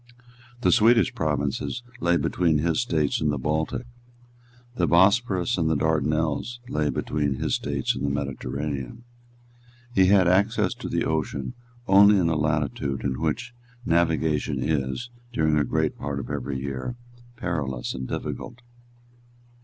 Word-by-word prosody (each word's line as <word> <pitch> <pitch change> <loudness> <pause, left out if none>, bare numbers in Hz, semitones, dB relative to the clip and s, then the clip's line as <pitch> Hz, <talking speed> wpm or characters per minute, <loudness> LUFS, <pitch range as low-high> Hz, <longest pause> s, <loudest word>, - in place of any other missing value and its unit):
The - - +3
Swedish 115 +3 +4
provinces 75 - -2 0.2
lay 85 0 +2
between 85 -3 +1
his 80 +9 +1
States 80 -11 0
and 75 -1 +2
the 75 - -1
Baltic. 80 - -1 0.9
The - - +1
Bosporus 95 +2 +3
and 80 -1 +1
the 80 - +2
Dardanelles 80 +7 0
lay 75 -6 0
between 75 -2 -1
his - - -2
States 70 -2 0
and 65 - -5
the 70 - +1
Mediterranean. 70 - -4 0.9
He 95 -3 +5
had 95 -2 +5
access 100 +6 +2
to - - -7
the - - 0
ocean 80 - -2 0.3
only 100 +2 +7
in 85 -3 +2
a 85 - +1
latitude 75 -3 -1
in 65 -3 -2
which 125 +1 -2 0.3
navigation 80 -3 +1
is, 75 - -2 0.2
during 80 -1 +2
a - - +2
great 80 +3 0
part 70 -1 -3
of 70 0 -6
every 70 -1 -3
year, 70 - -4 0.4
perilous 75 - -3
and 65 0 -5
difficult. 125 +1 -5
80 Hz, 140 wpm, -25 LUFS, 70-95 Hz, 0.9 s, only